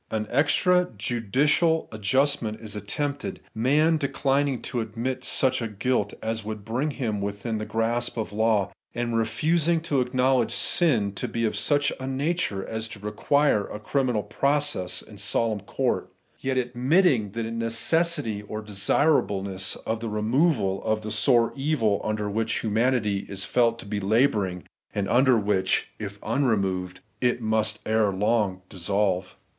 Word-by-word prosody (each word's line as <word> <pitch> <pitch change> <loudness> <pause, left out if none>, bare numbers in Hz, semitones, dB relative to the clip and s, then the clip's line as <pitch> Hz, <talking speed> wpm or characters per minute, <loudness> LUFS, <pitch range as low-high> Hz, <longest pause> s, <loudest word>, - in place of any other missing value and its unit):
An 110 -1 -2
extra 180 +7 +3
judicial 135 - +1
adjustment 115 +1 0
is 110 -2 -6
attempted; 140 +8 -4
man 150 +8 +3
declining 140 -2 0
to 120 - -3
admit 120 +4 -3
such 130 -2 +3
a 115 - -1
guilt 105 0 -1
as 110 0 -2
would 105 -1 -6
bring 125 +7 -1
him 115 -8 -3
within 100 +2 -3
the 110 - -5
grasp 120 +2 -1
of 110 -2 -3
law, 110 -2 +2 0.2
and 120 -1 -1
refusing 155 +9 +1
to 145 -5 0
acknowledge 125 -1 +1
sin 125 - +2
to 100 - -4
be 115 0 -1
of 110 - -1
such 145 +7 +1
a 130 - -5
nature 135 - -1
as 110 0 -4
to 105 -1 -10
require 105 +3 +1
a 105 - -7
criminal 125 -1 0
process 140 -6 0
in 105 -2 -13
solemn 110 +1 +1
court; 100 - -2 0.3
yet 130 -1 -1
admitting 125 - +2
the 115 0 -2
necessity 115 - 0
or 105 +1 -6
desirableness 100 -3 +1
of 110 0 -1
the 115 0 -4
removal 105 - +1
of 110 -1 0
the 110 - -5
sore 115 +2 +3
evil 135 -8 +1
under 105 -1 -2
which 110 +2 -1
humanity 110 -2 0
is 100 0 -3
felt 115 -2 +2
to - - -10
be 100 0 -3
labouring, 100 -4 +1 0.3
and 100 -2 -1
under 130 0 +4
which, 100 -3 +1
if 100 -1 -6
unremoved, 95 -7 0 0.2
it 125 -1 +2
must 110 -1 +1
ere 110 -2 +2
long 100 -1 0
dissolve. 95 -1 -1
115 Hz, 150 wpm, -25 LUFS, 105-130 Hz, 0.3 s, under